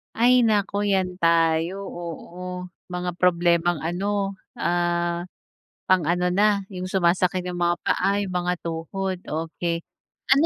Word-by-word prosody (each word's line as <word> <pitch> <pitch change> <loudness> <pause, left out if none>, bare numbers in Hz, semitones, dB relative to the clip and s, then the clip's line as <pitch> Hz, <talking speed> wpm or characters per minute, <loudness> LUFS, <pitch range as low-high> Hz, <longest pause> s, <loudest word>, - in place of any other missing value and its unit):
Ay 245 +1 +5
naku, 205 -1 +1
'yan 190 -3 +1
tayo, 165 +2 +2
oo. 180 +2 -7 0.2
Mga 180 -1 -4
problemang 175 -2 +3
ano, 195 +3 -1 0.2
ah, 175 0 0 0.6
pang-ano 180 0 +2
na, 200 0 +3
'yong 185 0 -4
sumasakit 180 0 +2
'yong 180 -1 -4
mga 175 0 +3
paa, 195 +2 +2
'yong 200 -2 -2
mga 180 0 0
tuhod, 180 +3 -3
okay. 165 +1 -3 0.5
Ano 280 +4 +4
180 Hz, 120 wpm, -24 LUFS, 170-195 Hz, 0.6 s, Ay